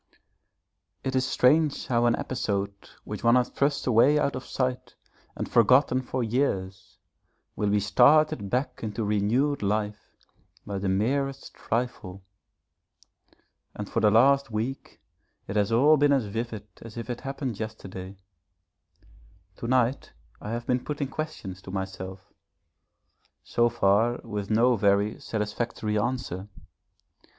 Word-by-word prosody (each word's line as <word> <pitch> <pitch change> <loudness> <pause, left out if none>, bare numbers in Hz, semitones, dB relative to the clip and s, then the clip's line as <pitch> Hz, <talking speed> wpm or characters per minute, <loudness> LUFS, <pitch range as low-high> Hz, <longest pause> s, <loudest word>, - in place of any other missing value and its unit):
It 130 0 -2
is 130 0 +1
strange 145 +4 +3
how 120 -1 +2
an 120 - +3
episode 100 -6 -2 0.3
which - - -7
one 115 +1 +5
has 125 -1 +2
thrust 140 0 0
away 130 +5 +5
out 140 -1 +1
of 130 0 -7
sight 125 -1 -3 0.4
and - - -4
forgotten 130 +3 +4
for 130 0 -3
years 105 -6 -2 0.6
will 105 - 0
be 105 0 +3
started 125 +1 +4
back 125 +5 -1
into 110 +1 -3
renewed 110 +8 +1
life 105 +1 -2 0.5
by 100 -1 -4
the 95 0 -1
merest 135 +8 -1
trifle. 105 -6 -4 1.5
And 105 - -5
for - - -1
the 105 - +4
last 135 +5 +4
week 115 +5 -4 0.5
it 100 - -5
has 105 0 +1
all 145 +7 +5
been 145 0 +4
as 135 -5 +1
vivid 110 0 -5 0.2
as 115 0 -10
if 115 - -5
it 120 -1 -5
happened 135 -5 -4
yesterday. 95 -3 -7 1.4
To 115 - -5
night 130 +1 +1 0.3
I 105 - -6
have 120 +1 -3
been 125 0 0
putting 145 -2 -3
questions 125 -12 -6
to - - -11
myself 95 0 -6 1.1
so 120 0 +2
far 115 +2 +2
with 105 -3 -5
no 120 +3 +4
very 100 +1 +2
satisfactory 105 0 -2
answer. 105 -5 -3
115 Hz, 135 wpm, -27 LUFS, 105-130 Hz, 1.5 s, one